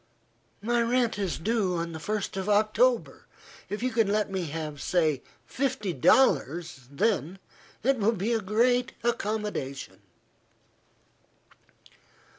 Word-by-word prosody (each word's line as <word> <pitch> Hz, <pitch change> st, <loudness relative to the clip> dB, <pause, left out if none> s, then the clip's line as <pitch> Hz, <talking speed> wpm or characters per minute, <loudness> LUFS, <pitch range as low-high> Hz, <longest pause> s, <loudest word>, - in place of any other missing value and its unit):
"My 240 Hz, +2 st, +2 dB
rent 235 Hz, -2 st, +1 dB
is 195 Hz, -4 st, -1 dB
due 200 Hz, -1 st, 0 dB
on 170 Hz, 0 st, -3 dB
the 160 Hz, -, -6 dB
first 210 Hz, +4 st, -3 dB
of 195 Hz, +1 st, -3 dB
October. 220 Hz, -, +2 dB, 0.4 s
If 210 Hz, +3 st, -4 dB
you 255 Hz, -, +1 dB
can 225 Hz, -3 st, +2 dB
let 205 Hz, 0 st, 0 dB
me 190 Hz, -2 st, -2 dB
have, 150 Hz, -2 st, -5 dB
say 155 Hz, -6 st, +1 dB, 0.2 s
fifty 255 Hz, -8 st, -2 dB
dollars, 160 Hz, -, +2 dB
then, 185 Hz, +2 st, 0 dB, 0.5 s
it 265 Hz, +1 st, +2 dB
will 215 Hz, +2 st, +3 dB
be 215 Hz, +4 st, -1 dB
a 225 Hz, -, +1 dB
great 245 Hz, +5 st, +2 dB
accommodation." 205 Hz, -, -3 dB
205 Hz, 120 wpm, -27 LUFS, 170-235 Hz, 0.5 s, will